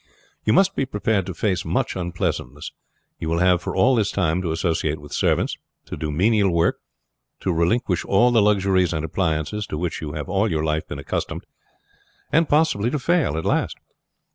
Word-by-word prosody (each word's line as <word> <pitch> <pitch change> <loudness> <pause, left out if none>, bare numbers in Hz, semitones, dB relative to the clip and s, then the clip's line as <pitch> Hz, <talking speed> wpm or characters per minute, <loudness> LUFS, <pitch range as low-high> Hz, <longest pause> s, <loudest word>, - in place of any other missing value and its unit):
You 110 - +3
must 195 +7 +4
be 135 - -1
prepared 105 -4 0
to 95 - -5
face 95 -4 0
much - - -1
unpleasantness. 80 -5 -3 0.5
You 80 - -3
will 85 - 0
have 90 0 +3
for - - -4
all 130 - +4
this 110 -5 +2
time 90 -2 0
to 85 -3 -2
associate 80 -2 -1
with 75 0 -11
servants, - - +1 0.3
to - - -6
do 75 - -4
menial 100 +5 +3
work, 85 0 +1 0.6
to 95 - 0
relinquish 90 +3 +1
all 120 +6 +4
the 115 -2 +4
luxuries 95 -4 +2
and 80 0 -2
appliances 80 +4 -2
to 75 - -4
which 85 +2 -3
you 75 -2 -5
have 75 - -5
all 100 +3 +1
your 80 -2 -1
life 80 0 -1
been - - -6
accustomed, 70 - -4 0.9
and 165 0 +3
possibly 145 -8 +2
to 150 - -1
fail 150 - +1
at 80 - -3
last. - - 0
90 Hz, 190 wpm, -22 LUFS, 80-105 Hz, 0.9 s, must